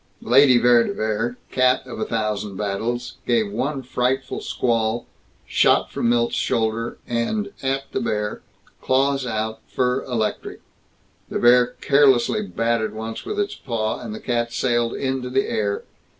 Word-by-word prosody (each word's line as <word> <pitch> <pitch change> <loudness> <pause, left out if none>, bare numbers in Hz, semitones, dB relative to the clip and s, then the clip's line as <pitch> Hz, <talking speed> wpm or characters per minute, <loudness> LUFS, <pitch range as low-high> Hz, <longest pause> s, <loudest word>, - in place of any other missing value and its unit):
Lady 130 +1 +6
Vere 120 0 +5
de 200 - -2
Vere, 110 +3 -1
cat 130 0 +2
of 125 - -8
a - - -1
thousand 105 -3 -2
battles, 115 +5 -3
gave 115 -4 +2
one 135 +5 -2
frightful 125 +1 -1
squawl, 115 -1 -1 0.4
shot - - +3
from 115 - 0
Milt's 120 0 +2
shoulder 115 +1 -1
and 200 - -1
at 135 +1 -1
the - - -2
bear, 105 -1 -2 0.4
claws 135 0 +1
out, 110 -1 -2
fur 125 +1 0
electric. 115 -4 -3 0.7
The - - -2
bear 120 0 +4
carelessly 140 - +4
batted 115 - -1
once 110 +1 -6
with 420 0 -3
its 405 -1 -1
paw, 110 -3 -3
and 110 -3 -6
the - - -7
cat 120 -1 -1
sailed 120 -1 0
into 130 -2 -2
the 135 +1 +1
air. 100 -1 -1
120 Hz, 150 wpm, -22 LUFS, 110-130 Hz, 0.7 s, Lady